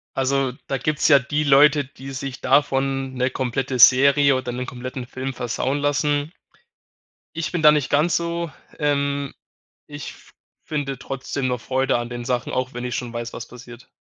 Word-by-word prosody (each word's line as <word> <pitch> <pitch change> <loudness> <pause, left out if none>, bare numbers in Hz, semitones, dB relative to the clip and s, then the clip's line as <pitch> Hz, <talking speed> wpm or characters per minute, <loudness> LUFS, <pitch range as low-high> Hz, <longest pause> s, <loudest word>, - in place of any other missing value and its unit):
Also, 135 -1 +1 0.2
da 135 - 0
gibt's 155 +1 0
ja 140 -3 +8
die 145 +3 -1
Leute, 145 +1 +5
die 135 0 -11
sich 135 -1 -6
davon 135 -1 +1
'ne 125 0 +1
komplette 130 0 -2
Serie 140 +3 +6
oder 130 -1 -3
'nen 125 +1 -4
kompletten 125 0 -6
Film 130 +1 -5
versauen 125 +4 -2
lassen. 145 +2 0 1.0
Ich 160 -1 -3
bin 175 -3 -1
da 150 - +9
nicht 150 -3 0
ganz 150 +3 +3
so. 170 0 -2 0.3
Ähm, 140 -1 0 0.5
ich 145 0 -7
f - - -19 0.3
finde 140 -4 -3
trotzdem 135 0 -4
noch 125 -2 -2
Freude 130 0 0
an 120 0 -4
den 120 0 -6
Sachen, 125 -1 -2
auch 130 0 -2
wenn 120 - -5
ich 125 - -3
schon 120 -2 -5
weiß, 120 0 -5
was 115 - -7
passiert. 125 0 -13
135 Hz, 175 wpm, -22 LUFS, 125-145 Hz, 1.0 s, da